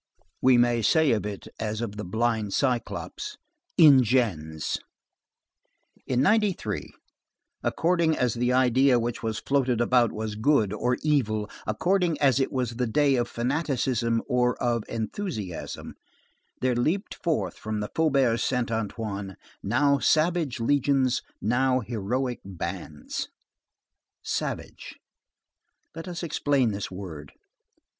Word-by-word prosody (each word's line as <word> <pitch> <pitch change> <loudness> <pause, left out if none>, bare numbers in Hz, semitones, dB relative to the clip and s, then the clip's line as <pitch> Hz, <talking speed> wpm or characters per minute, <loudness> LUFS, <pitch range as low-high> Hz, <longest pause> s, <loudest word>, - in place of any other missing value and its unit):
We 130 -1 +5
may 120 -1 +3
say 160 +5 +4
of 105 -2 0
it 100 -2 -7
as 110 -1 -2
of 115 -3 -4
the 105 - -5
blind 110 +1 -1
cyclops, 135 - -2 0.4
Ingens. 115 - +3 1.3
In 130 0 +2
'93, 195 - +1 0.7
according 170 -2 +1
as 125 -3 +1
the 125 +1 0
idea 130 +1 +4
which 120 0 -3
was 110 -2 -2
floating 130 -3 +1
about 120 -1 +3
was 110 0 -4
good 110 -2 +2
or 125 +3 0
evil, 110 -9 +1 0.2
according 175 -1 +1
as 135 -2 +4
it 135 - 0
was 125 -3 -2
the 125 -1 0
day 140 +5 +3
of 120 -1 0
fanaticism 125 -3 0
or 125 -2 +2
of 120 -1 +1
enthusiasm, 110 - -5 0.7
there 130 -1 +2
leaped 160 - 0
forth 105 - 0
from 110 0 -3
the 105 - -4
Faubourg 135 -7 +2
Saint 125 -3 0
Antoine 105 -3 -3 0.3
now 140 -1 +2
savage 155 -3 +2
legions, 135 0 +2 0.2
now 130 +4 +2
heroic 120 +3 -2
bands. 80 -5 -5 1.0
Savage. - - -4 1.0
Let 165 +3 -8
us 175 -1 -5
explain 140 -6 +1
this 100 0 -4
word. 85 -7 -8
125 Hz, 120 wpm, -26 LUFS, 110-140 Hz, 1.3 s, We